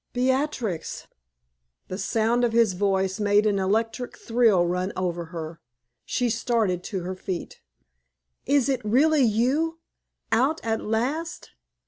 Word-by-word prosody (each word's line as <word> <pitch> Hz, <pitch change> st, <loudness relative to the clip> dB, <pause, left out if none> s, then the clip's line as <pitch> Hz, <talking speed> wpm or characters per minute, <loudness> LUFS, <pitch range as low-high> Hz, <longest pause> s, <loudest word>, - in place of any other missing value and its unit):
"Beatrix!" 255 Hz, -, -1 dB, 0.8 s
The 185 Hz, -, -5 dB
sound 230 Hz, +2 st, +1 dB
of 235 Hz, -2 st, +1 dB
his 230 Hz, -4 st, +4 dB
voice 190 Hz, 0 st, 0 dB
made 205 Hz, 0 st, +3 dB
an 205 Hz, -2 st, +2 dB
electric 225 Hz, +5 st, -1 dB
thrill 225 Hz, -7 st, +3 dB
run 180 Hz, +2 st, -1 dB
over 175 Hz, -2 st, -2 dB
her. 165 Hz, -1 st, -7 dB, 0.4 s
She 245 Hz, -, 0 dB
started 215 Hz, -6 st, 0 dB
to 190 Hz, -4 st, -3 dB
her 185 Hz, +2 st, -3 dB
feet. 185 Hz, -1 st, -6 dB, 0.9 s
"Is 280 Hz, -1 st, +3 dB
it 265 Hz, -4 st, 0 dB
really 280 Hz, +8 st, +3 dB
you 260 Hz, +9 st, +1 dB, 0.5 s
out 270 Hz, +8 st, +2 dB
at 225 Hz, -1 st, -1 dB
last?" 265 Hz, +10 st, -2 dB
220 Hz, 125 wpm, -25 LUFS, 190-250 Hz, 0.9 s, his